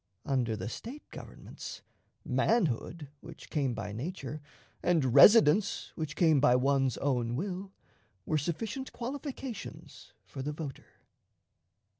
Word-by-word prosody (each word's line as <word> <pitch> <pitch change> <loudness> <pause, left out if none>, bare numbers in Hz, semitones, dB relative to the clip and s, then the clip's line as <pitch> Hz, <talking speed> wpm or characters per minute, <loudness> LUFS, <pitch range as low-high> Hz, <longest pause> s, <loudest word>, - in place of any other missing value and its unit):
Under 125 -6 0
the 110 - -5
State 245 - -7
governments, - - -9 0.4
manhood, 165 - 0
which 165 +3 -12
came 135 -6 0
by 105 -2 -4
nature, 145 - -5 0.4
and 155 -9 +2
residence, 200 - +6
which 155 -2 -4
came 160 -4 +4
by 125 -3 +5
one's 135 -1 +2
own 125 -4 0
will, 190 +5 -4 0.5
were 155 - +1
sufficient 215 - -3
qualifications 260 -3 -7
for 135 - -7
the 150 +3 -3
voter. 145 -3 -7
150 Hz, 115 wpm, -31 LUFS, 130-195 Hz, 0.5 s, residence